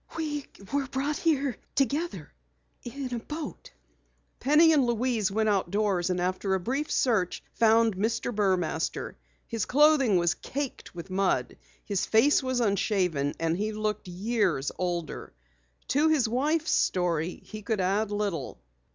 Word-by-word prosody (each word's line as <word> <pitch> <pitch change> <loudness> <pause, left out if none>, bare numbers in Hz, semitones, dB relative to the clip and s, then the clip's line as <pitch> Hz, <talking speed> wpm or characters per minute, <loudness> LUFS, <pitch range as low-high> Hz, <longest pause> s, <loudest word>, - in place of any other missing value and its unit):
"We 295 -3 -3 0.3
were 280 -1 0
brought 275 +3 -2
here 285 -6 0 0.2
together 275 - -1 0.5
in 255 +1 -5
a 240 - -2
boat." 300 +5 -7 0.7
Penny 310 +4 +5
and 290 -3 +4
Louise 235 -3 0
went 220 +2 0
outdoors 195 -2 +1
and 180 -1 0
after 185 +2 0
a - - 0
brief 270 +10 -2
search 215 -8 +1
found 225 -1 +4
Mr. 230 +4 -1
Burmaster. 185 -6 -1 0.3
His 225 -2 -2
clothing 280 -7 +4
was 170 -1 +2
caked 275 -8 -6
with 175 +2 -8
mud, 190 0 0 0.3
his 200 -3 -1
face 270 +8 +4
was 260 -2 -1
unshaven 185 -9 0
and 165 0 0
he 210 +4 -2
looked 215 -2 -3
years 185 - 0
older. 175 -3 -3 0.6
To 295 +4 +3
his 290 -7 +3
wife's 295 +7 0
story 175 -2 0
he 215 -1 -8
could 215 0 -2
add 195 +3 +1
little. 200 - -3
215 Hz, 140 wpm, -28 LUFS, 185-265 Hz, 0.7 s, Penny